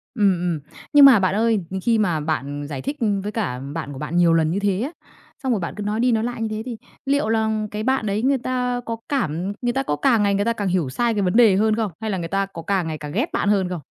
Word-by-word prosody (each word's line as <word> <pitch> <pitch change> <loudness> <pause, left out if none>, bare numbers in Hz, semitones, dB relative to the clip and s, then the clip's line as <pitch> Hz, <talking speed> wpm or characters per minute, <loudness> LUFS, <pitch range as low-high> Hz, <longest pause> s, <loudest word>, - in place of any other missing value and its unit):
Ừm, 205 -4 +4
ừm. 175 -3 -1 0.3
Nhưng 290 -1 +8
mà 265 -6 +9
bạn 185 0 +1
ơi, 225 0 +2 0.2
khi 230 +1 +2
mà 175 -7 +1
bạn 145 -1 -3
giải 135 -3 -5
thích 290 - -3 0.3
với 210 +2 -4
cả 195 - -2 0.2
bạn 145 - -4
của 135 - -8
bạn 165 +6 -4
nhiều 175 -1 +5
lần 160 -1 +2
như 180 - -1
thế 200 -1 0
á, 270 - -2 0.5
xong 260 - 0
rồi 215 - 0
bạn 170 - -4
cứ 210 - -4
nói 210 +2 -1
đi 245 0 +3
nói 220 0 +1
lại 240 -1 -4
như 220 - 0
thế, 215 0 -4
thì 240 -2 -5 0.3
liệu 280 -5 +1
là 220 0 +1 0.2
cái 210 0 -4
bạn 260 -2 0
đấy 205 +2 -1
người 270 +1 +2
ta 250 0 -1
có 230 - -3
cảm 190 - -1
người 240 - +1
ta 270 - 0
có 150 - -1
càng 225 - +3
ngày 200 -1 +2
người 200 +1 +1
ta 230 - +2
càng 205 -4 -3
hiểu 175 -6 0
sai 235 - 0
cái 205 - 0
vấn 185 +3 +1
đề 220 -6 +6
hơn 215 +1 +2
không? 220 -5 -1
Hay 220 -1 -3
là 190 - -1
người 165 - -4
ta 195 +2 0
có 170 -4 -9
càng 190 -1 0
ngày 155 -1 -4
càng 150 0 -7
ghét 245 +9 0
bạn 205 - 0
hơn 195 -3 +2
không? 180 -3 -4
205 Hz, 295 wpm, -22 LUFS, 175-230 Hz, 0.5 s, mà